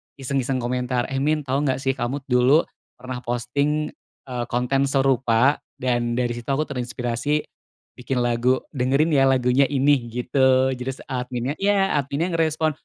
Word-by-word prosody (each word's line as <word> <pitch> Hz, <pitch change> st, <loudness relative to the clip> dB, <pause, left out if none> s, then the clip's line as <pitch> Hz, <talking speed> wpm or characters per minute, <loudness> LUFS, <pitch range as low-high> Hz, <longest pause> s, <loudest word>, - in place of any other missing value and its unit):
iseng-iseng 135 Hz, -1 st, -2 dB
komentar, 125 Hz, 0 st, -1 dB
"Eh, 135 Hz, -, -1 dB
Min, 150 Hz, +2 st, +1 dB
tau 135 Hz, 0 st, -1 dB
nggak 145 Hz, -3 st, +1 dB
sih 135 Hz, -, +2 dB
kamu 130 Hz, +2 st, -3 dB
dulu 125 Hz, +6 st, +5 dB, 0.3 s
pernah 125 Hz, 0 st, -6 dB
posting, 140 Hz, +5 st, -1 dB, 0.3 s
eee, 125 Hz, -3 st, -4 dB
konten 125 Hz, +3 st, 0 dB
serupa 135 Hz, -1 st, +2 dB, 0.2 s
dan 120 Hz, -2 st, -1 dB
dari 120 Hz, -1 st, 0 dB
situ 120 Hz, 0 st, -7 dB
aku 140 Hz, +3 st, +1 dB
terinspirasi 125 Hz, +2 st, -2 dB, 0.6 s
bikin 125 Hz, 0 st, -1 dB
lagu, 120 Hz, +2 st, +1 dB
dengerin 140 Hz, +4 st, +1 dB
ya 135 Hz, -2 st, +4 dB
lagunya 130 Hz, +1 st, +3 dB
ini," 140 Hz, -3 st, +2 dB
gitu. 130 Hz, +2 st, +2 dB
Terus 130 Hz, +1 st, -5 dB
adminnya 125 Hz, +2 st, -3 dB
iya, 195 Hz, -1 st, +2 dB
adminnya 145 Hz, +6 st, -2 dB
ngerespon, 160 Hz, -1 st, +1 dB
130 Hz, 145 wpm, -23 LUFS, 125-140 Hz, 0.6 s, dulu